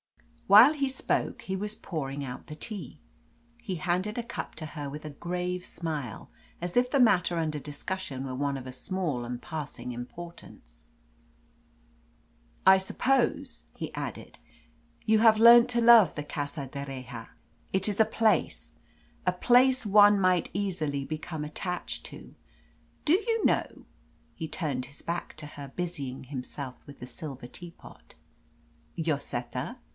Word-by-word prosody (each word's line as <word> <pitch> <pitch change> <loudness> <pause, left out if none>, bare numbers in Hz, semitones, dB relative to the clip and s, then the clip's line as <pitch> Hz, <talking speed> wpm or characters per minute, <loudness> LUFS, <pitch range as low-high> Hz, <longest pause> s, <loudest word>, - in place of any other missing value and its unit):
While 215 +9 +9
he 280 -3 0
spoke 265 - -1
he 190 - -3
was 210 +2 -2
pouring 145 -9 -4
out 125 -1 -8
the 150 - -7
tea. 210 +4 -7 0.6
He 200 -6 -4
handed 185 +6 -1
a 240 - -1
cup - - -6
to 155 - -6
her 145 -2 -6
with 150 +2 -8
a 155 - -5
grave 180 +4 -3
smile, 155 - -4 0.3
as 175 0 -4
if 250 0 +3
the 280 - +3
matter 180 -8 +4
under 155 -2 -1
discussion 145 -1 -5
were 130 -1 -4
one 140 +1 -1
of 130 -1 -8
a 130 - -7
small 150 -2 -2
and 120 0 -5
passing 150 -5 -6
importance. 120 - -10 1.8
"I 190 0 +8
suppose," 260 +8 0
he - - -6
added, - - -6 0.7
"you 220 -1 +4
have 220 -1 +6
learnt 235 +1 +9
to 240 -1 +1
love 230 -4 +7
the 150 - -3
Casa 145 -1 -4
d'Erraha. 130 -4 -7 0.4
It 190 +1 +4
is 205 0 -1
a - - +8
place 220 0 0 0.5
a 180 - +4
place 250 +6 +4
one 205 0 +7
might 185 -2 +2
easily 160 -8 -2
become 155 0 -5
attached 180 +4 -4
to. - - -12 0.7
Do 310 - +4
you 445 +4 +1
know" - - 0 0.5
he 160 -2 -6
turned 145 -6 -2
his 140 +3 -12
back 170 -1 -4
to 155 - -8
her, 145 -2 -9
busying 145 -8 -4
himself 130 0 -6
with 140 -1 -13
the 125 - -8
silver 135 -4 -7
teapot 170 +6 -12 0.8
"Lloseta?" 140 - -3
170 Hz, 145 wpm, -28 LUFS, 140-205 Hz, 1.8 s, While